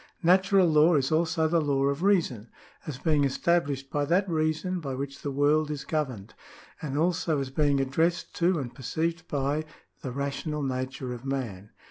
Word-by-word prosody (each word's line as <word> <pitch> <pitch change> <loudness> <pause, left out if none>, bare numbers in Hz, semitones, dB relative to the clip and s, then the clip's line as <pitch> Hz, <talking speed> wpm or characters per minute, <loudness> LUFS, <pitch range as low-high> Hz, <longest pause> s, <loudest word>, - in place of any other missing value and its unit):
Natural 190 +2 +5
law 155 +1 +5
is 135 -1 +1
also 160 0 +2
the 165 +1 +2
Law 140 -2 +1
of 140 +2 0
Reason, 165 - +1 0.4
as 145 -4 -4
being 150 0 +2
established 140 -1 0
by 145 - 0
that 185 +6 +2
Reason 160 +2 -1
by 135 -5 -4
which 140 +1 -6
the 145 - -3
world 145 +2 +2
is 145 -2 -4
governed, 130 -11 -3 0.5
and 145 -2 -3
also 165 -1 +1
as 135 -1 -4
being 145 0 +2
addressed 165 +6 0
to 175 +1 +2
and 125 -5 -4
perceived 165 +5 -3
by 145 +2 -1 0.4
the 130 - -4
rational 140 +3 -3
nature 130 -1 -3
of 120 0 -9
man. 120 -8 -4
150 Hz, 170 wpm, -27 LUFS, 135-165 Hz, 0.5 s, Natural